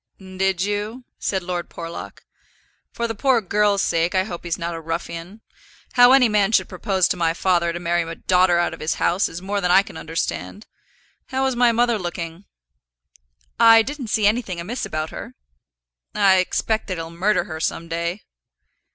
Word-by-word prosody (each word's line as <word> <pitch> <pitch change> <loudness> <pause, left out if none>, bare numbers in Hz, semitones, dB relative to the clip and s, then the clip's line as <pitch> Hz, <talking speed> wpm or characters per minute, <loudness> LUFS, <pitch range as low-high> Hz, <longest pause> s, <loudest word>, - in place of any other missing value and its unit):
"Did 190 -1 -1
you?" 205 +5 -3 0.2
said 190 -2 -1
Lord 175 -1 -4
Porlock. 170 0 -8 0.7
"For 235 - -2
the 225 - -3
poor 250 +3 +2
girl's 205 0 +1
sake 165 +2 0
I 185 - +3
hope 175 -4 -7
he's 170 - -2
not 170 0 -4
a 165 - -6
ruffian. 170 +5 -6 0.5
How 245 0 +7
any 265 -2 +6
man 210 -2 +2
should - - +3
propose 190 0 0
to - - -1
my 165 -1 +1
father 175 -2 +1
to 170 - -5
marry 175 0 0
a 165 0 -5
daughter 180 0 +3
out 175 - 0
of - - -9
his 155 +1 -1
house, 180 +4 +1
is 170 +2 -8
more 200 +1 -2
than 180 - 0
I 190 +2 +6
can - - -11
understand. 165 +5 -4 0.6
How 265 -3 -1
was 265 -1 0
my 240 0 +4
mother 235 -1 +2
looking?" 175 0 -6 1.1
"I 225 0 +7
didn't 280 -1 -6
see 215 -1 +1
anything 210 -4 0
amiss 200 +5 -4
about 155 -3 -4
her." - - -8 0.8
"I 195 -2 +5
expect 215 +4 0
that 185 -3 -3
he'll 165 0 -6
murder 190 +5 +1
her 160 -1 -7
some 165 +1 -2
day." 170 +4 -3
185 Hz, 185 wpm, -22 LUFS, 170-215 Hz, 1.1 s, How